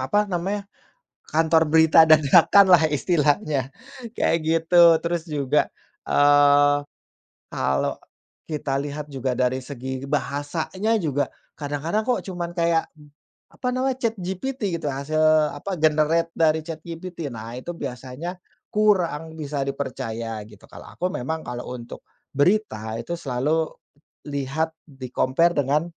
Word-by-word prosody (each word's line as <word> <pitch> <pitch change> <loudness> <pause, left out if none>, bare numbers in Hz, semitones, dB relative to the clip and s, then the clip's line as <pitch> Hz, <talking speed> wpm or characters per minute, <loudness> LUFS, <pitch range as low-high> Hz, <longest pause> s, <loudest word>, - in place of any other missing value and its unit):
apa 205 +11 +1
namanya, 195 +3 -2 0.6
kantor 160 0 +3
berita 160 +1 +6
dadakan 160 +6 +6
lah 170 -3 +7
istilahnya, 150 - 0 0.4
kayak 165 - +2
gitu. 165 0 +5
Terus 170 -1 -1
juga, 145 -1 +1 0.4
eee, 145 0 +5 0.8
kalau 70 0 0 0.5
kita 145 -3 -2
lihat 145 +1 -6
juga 135 -2 -3
dari 130 +1 +1
segi 130 0 -6
bahasanya 155 +9 -1
juga 145 -4 -1 0.2
kadang-kadang 150 +8 -2
kok 245 +2 0
cuman 175 -2 -4
kayak 170 -1 +1 0.7
apa 250 - -5
namanya 260 +1 0
ChatGPT, 210 0 -2
gitu, 150 - -3
hasil 155 +2 +2
apa, 180 +5 -5
generate 155 +2 +2
dari 160 -1 +3
ChatGPT. 165 0 -7
Nah, 115 0 -8
itu 130 +8 -6
biasanya 130 +7 -6 0.4
kurang 175 -7 +1
bisa 145 -2 -3
dipercaya, 115 -5 -4
gitu. 105 -2 -16
Kalau - - -12
aku 180 - -3
memang 160 +6 -3
kalau 125 +1 -6
untuk 120 0 -10 0.3
berita 140 - 0
itu 120 +9 -5
selalu 150 +5 0 0.6
lihat, 145 +3 -2 0.2
di-compare 135 +5 0
dengan 145 +3 +1
155 Hz, 120 wpm, -23 LUFS, 140-170 Hz, 0.8 s, lah